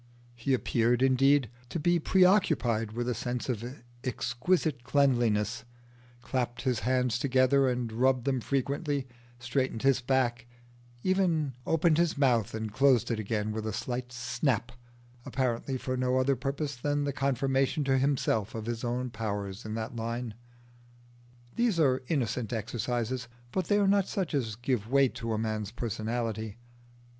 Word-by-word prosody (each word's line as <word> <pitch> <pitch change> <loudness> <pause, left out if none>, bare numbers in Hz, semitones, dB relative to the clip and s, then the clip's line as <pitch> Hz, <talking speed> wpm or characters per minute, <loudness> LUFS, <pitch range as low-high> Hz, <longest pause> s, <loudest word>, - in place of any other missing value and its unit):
He 120 +3 0
appeared, 120 0 +1
indeed, 135 0 +4 0.2
to 170 - -3
be 175 +3 +3
preoccupied 155 - +3
with 120 +1 -2
a 125 - +1
sense 120 +2 -3
of 115 -4 -1
his 125 +3 -6 0.3
exquisite 130 +3 0
cleanliness, 120 -5 +2 0.6
clapped 120 -2 -2
his 125 -4 +1
hands 125 0 +1
together 135 0 +3
and 120 -2 -2
rubbed 130 +1 +2
them 130 -3 +1
frequently, 140 +2 -1 0.3
straightened 120 -1 -2
his 135 -1 +3
back, 125 -1 0 0.6
and - - -17
even 165 -7 +1
opened 165 0 +3
his 170 -3 +2
mouth 120 -7 +2
and 110 -1 -4
closed 130 -3 +4
it 115 - -1
again 105 0 -1
with 110 0 -3
a - - -1
slight 125 +3 -4
snap, 120 0 -1 0.5
apparently 130 +1 -1
for 130 0 -3
no 130 0 +1
other 130 +1 +3
purpose 140 +2 -3
than 145 +4 -1
the 140 -1 -1
confirmation 135 +2 +1
to 135 -1 +2
himself 130 -6 0
of 110 -1 -4
his 120 0 -3
own 125 +1 -2
powers 105 -1 -4
in 110 0 -4
that 115 +1 -4
line. 115 0 -3 1.2
These 235 -7 +2
are 130 -4 +3
innocent 125 -6 -1
exercises, 120 +2 -2 0.2
but 185 -2 -1
they 205 - +3
are 200 -1 +3
not 200 -1 +3
such 190 -7 -2
as 115 -7 -1
give 120 -2 -2
weight 135 -1 +4
to 115 -1 -3
a - - 0
man's 110 -2 -2
personality. 110 -1 -3
125 Hz, 155 wpm, -29 LUFS, 115-140 Hz, 1.2 s, indeed